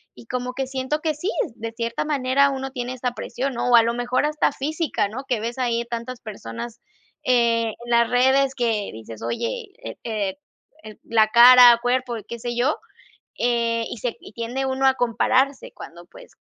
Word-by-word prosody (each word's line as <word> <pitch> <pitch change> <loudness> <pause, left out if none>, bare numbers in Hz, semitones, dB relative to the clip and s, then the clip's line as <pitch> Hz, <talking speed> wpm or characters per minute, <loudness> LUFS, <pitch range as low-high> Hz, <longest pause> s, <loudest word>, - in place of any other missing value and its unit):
Y - - -14
como 250 0 -3
que 265 0 -3
siento 265 +3 -2
que 315 -1 0
sí, 350 +7 -3 0.3
de 230 0 -6
cierta 230 +2 -3
manera 280 -1 +2
uno 270 0 -4
tiene 250 -1 -4
esta 250 -1 -2
presión, 265 +2 -4
¿no? 240 - -1
O - - +7
a 230 - +7
lo 230 +1 0
mejor 245 +3 0
hasta 300 0 +1
física, 300 -7 -2
¿no? 260 +6 -7
Que 245 -4 0
ves 235 +2 -4
ahí, 235 -2 0
tantas 235 +1 -6
personas, 215 - -8 0.5
eh, 230 -2 +2
en - - -10
las 235 -1 +4
redes 265 +2 +3
que 225 -5 -1
dices: 110 0 -10
"Oye, 235 - -3 0.2
eh - - -7
eh 210 -4 -2 0.5
eh, 215 -1 -10
la 220 -1 +3
cara, 245 +1 +9
cuerpo", 245 0 0
qué 235 - -7
sé 240 +1 -4
yo, 255 +6 +1 0.6
eh, 235 -1 +1
y - - -6
se 235 +2 -3
y - - -13
tiende 240 +4 -3
uno 265 0 0
a 265 - +5
compararse 255 +3 +1
cuando, 175 +1 -11
pues, - - -16
245 Hz, 190 wpm, -23 LUFS, 230-265 Hz, 0.6 s, cara